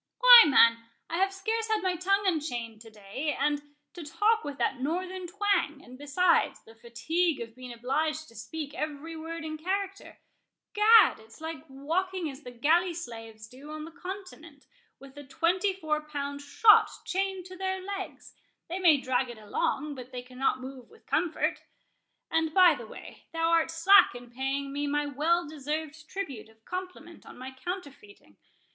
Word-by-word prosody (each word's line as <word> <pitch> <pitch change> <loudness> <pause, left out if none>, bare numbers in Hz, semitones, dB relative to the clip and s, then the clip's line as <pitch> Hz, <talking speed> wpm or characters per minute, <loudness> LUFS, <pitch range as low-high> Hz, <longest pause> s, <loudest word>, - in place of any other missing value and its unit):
"Why, - - +10
man, 230 -5 +5 0.3
I 335 - -1
have 385 +1 +2
scarce 440 +3 -2
had 435 -3 0
my 370 -1 +1
tongue 395 +3 +1
unchained 245 - -2
to 225 - -12
day; 220 +8 -4
and 290 +1 +1 0.3
to 350 - -8
talk 415 +9 +1
with 285 -1 -6
that 265 - -1
northern 365 +5 -3
twang, 360 -6 0
and 250 - -13
besides, 290 +6 +1
the 225 - -16
fatigue 305 +9 -1
of 230 -1 -7
being 255 -1 -9
obliged 300 +6 -2
to 230 - -18
speak 285 +6 -6
every 310 +1 -5
word 325 +1 -6
in 310 0 -5
character,—Gad, 400 +3 +1
it's 220 +1 -17
like 320 0 -7
walking 330 +5 -2
as 270 +2 -12
the 250 - -9
galley 330 +9 +2
slaves 225 -8 -9
do 265 +6 -13
on 310 0 -6
the 330 - -10
Continent, 345 -4 -9 0.3
with 275 0 -14
a - - -9
twenty 355 +8 +1
four 310 -5 -2
pound 285 -2 -5
shot 425 +9 +5 0.2
chained 385 -1 -2
to 370 0 -10
their 380 0 -2
legs—they 380 -2 -8
may 335 -5 +6
drag 255 -1 -1
it 240 - -9
along, 265 +7 -2
but 255 -2 -10
they 250 -1 -6
cannot 255 +1 -1
move 260 -2 -9
with 450 - -21
comfort. 340 -3 0 0.7
And, 320 -1 0
by 370 -2 +7
the - - -8
way, - - -12
thou 330 0 +1
art 330 -1 +3
slack 330 -1 +5
in 245 0 -11
paying 270 +2 -3
me 290 +1 -2
my 295 +1 0
well 315 +4 0
deserved 310 +1 -5
tribute 280 - -6
of 220 0 -25
compliment 365 -2 -7
on - - -13
my 260 +1 -8
counterfeiting. 265 - -9
310 Hz, 170 wpm, -28 LUFS, 265-365 Hz, 0.7 s, Why